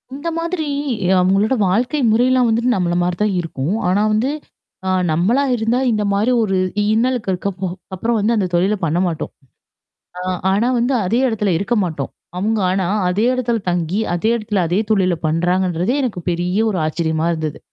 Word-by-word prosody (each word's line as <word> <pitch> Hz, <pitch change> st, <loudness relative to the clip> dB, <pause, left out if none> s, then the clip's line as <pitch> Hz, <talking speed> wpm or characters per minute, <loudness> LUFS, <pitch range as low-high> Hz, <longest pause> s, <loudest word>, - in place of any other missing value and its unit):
இந்த 325 Hz, +4 st, -4 dB
மாதிரி 335 Hz, -1 st, -2 dB, 0.5 s
அவங்களோட 195 Hz, +7 st, +2 dB
வாழ்க்கை 245 Hz, +10 st, +1 dB
முறைல்லாம் 250 Hz, +2 st, +3 dB
வந்துட்டு 235 Hz, +3 st, +1 dB
நம்மள 175 Hz, -2 st, 0 dB
மாரி 175 Hz, 0 st, 0 dB
தான் 210 Hz, -3 st, +1 dB
இருக்கும். 165 Hz, +2 st, -3 dB
ஆனா 195 Hz, +3 st, +2 dB
வந்து 240 Hz, +6 st, +1 dB, 0.6 s
ஆ -, -, +1 dB, 0.2 s
நம்மளா 200 Hz, -, +2 dB
இருந்தா 230 Hz, +2 st, 0 dB
இந்த 210 Hz, -2 st, 0 dB
மாரி 215 Hz, +5 st, +2 dB
ஒரு 195 Hz, -3 st, 0 dB, 0.4 s
இன்னலுக்கு 240 Hz, -2 st, 0 dB
இருக்க 185 Hz, +2 st, -2 dB, 0.5 s
அப்புறம் 230 Hz, +5 st, 0 dB
வந்து, 220 Hz, +3 st, +1 dB
அந்த 200 Hz, -4 st, +1 dB
தொழில 190 Hz, +5 st, +2 dB
பண்ண 165 Hz, +2 st, 0 dB
மாட்டோம். 165 Hz, -3 st, -4 dB, 0.9 s
ஆ -, -, -4 dB, 0.3 s
ஆனா 215 Hz, +5 st, +2 dB
வந்து 245 Hz, +3 st, +1 dB
அதே 225 Hz, +7 st, +1 dB
இடத்துல 210 Hz, -4 st, 0 dB
இருக்க 200 Hz, +6 st, -1 dB
மாட்டோம். 155 Hz, -6 st, -4 dB, 0.3 s
அவுங்க 215 Hz, +3 st, 0 dB
ஆனா, 185 Hz, -1 st, 0 dB, 0.2 s
அதே 195 Hz, +5 st, +1 dB
இடத்துல 240 Hz, -2 st, 0 dB
தங்கி, 175 Hz, +3 st, -1 dB
அதே 195 Hz, +6 st, 0 dB
இடத்துல 210 Hz, -3 st, -1 dB
அதே 180 Hz, +4 st, +1 dB
தொழில 190 Hz, -4 st, +3 dB
பண்றாங்கன்றதே 180 Hz, -, 0 dB
எனக்கு 215 Hz, -8 st, -2 dB
பெரிய 175 Hz, +3 st, -1 dB
ஒரு 190 Hz, -, -2 dB
ஆச்சரியமா 160 Hz, 0 st, -1 dB
இருந்தது. 155 Hz, -2 st, -4 dB
200 Hz, 165 wpm, -19 LUFS, 175-230 Hz, 0.9 s, முறைல்லாம்